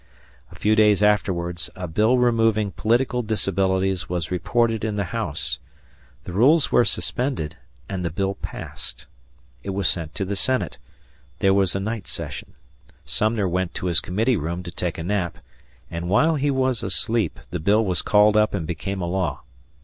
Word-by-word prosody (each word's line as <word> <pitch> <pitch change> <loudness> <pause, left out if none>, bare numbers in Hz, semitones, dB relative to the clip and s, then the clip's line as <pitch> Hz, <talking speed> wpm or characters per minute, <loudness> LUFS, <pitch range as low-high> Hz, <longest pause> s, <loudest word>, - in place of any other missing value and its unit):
A - - -13
few 110 +1 +2
days 105 -2 +4
afterwards, 90 -4 +1
a 90 -1 -5
bill 110 +10 +3
removing 115 -4 +2
political 125 +5 +1
disabilities 95 -5 0
was 85 -2 -3
reported 115 +5 +1
in 110 -2 -1
the 100 - 0
House; 65 0 -2 0.6
the 90 - -7
rules 140 - +4
were - - +5
suspended, 125 - -1 0.3
and 95 -2 -4
the 85 - -1
bill 95 +5 -1
passed. 60 -9 -7 0.6
It - - -7
was 100 - +1
sent 80 -4 -2
to 100 - -1
the 100 +2 -2
Senate; 130 +6 0 0.6
there 95 0 +3
was 95 -2 +2
a - - 0
night 105 -2 -4
session; - - -5 0.5
Sumner 110 -2 0
went 90 0 -1
to - - -4
his 85 -2 +3
committee 110 +6 0
room 85 +3 -3
to 85 - -7
take 85 0 -3
a 80 - -4
nap, 90 -2 -1 0.5
and 85 +1 -4
while 155 - +4
he 145 -1 0
was 130 -3 +1
asleep, 95 +2 +1
the 90 - -2
bill 105 +7 +3
was 90 -2 0
called 105 0 +4
up 105 -1 +3
and 85 -5 -3
became 90 +4 -4
a - - -1
law. 85 -8 -2
100 Hz, 170 wpm, -23 LUFS, 90-110 Hz, 0.6 s, were